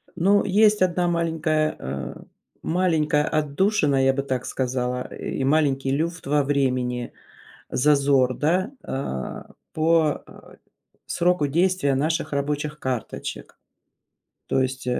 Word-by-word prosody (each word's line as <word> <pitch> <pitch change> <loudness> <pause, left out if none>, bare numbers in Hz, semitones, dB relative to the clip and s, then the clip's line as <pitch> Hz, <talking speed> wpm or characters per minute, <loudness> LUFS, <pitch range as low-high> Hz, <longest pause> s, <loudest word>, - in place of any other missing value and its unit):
Ну, 195 +4 +3
есть 210 +1 +4
одна 180 -1 +2
маленькая, 160 -2 0
э, 65 +1 -5 0.5
маленькая 160 -4 +1
отдушина, 150 -2 +1
я 135 - +4
бы 135 +1 -2
так 130 -3 -3
сказала, 125 -1 -2
и 135 - -4
маленький 135 -2 +2
люфт 165 +5 -2
во 145 0 +2
времени, 125 -3 -1 0.6
зазор, 140 -2 +3
да. 180 - 0
А, 65 - -5 0.3
по, 160 -1 +2
э, - - -15 0.5
сроку, 175 -3 +1
э, - - -2
действия 170 -3 +2
наших 155 +1 -1
рабочих 150 +1 -2
карточек, 125 - -5 0.9
то - - +1
есть 130 0 -4
150 Hz, 115 wpm, -24 LUFS, 135-165 Hz, 0.9 s, есть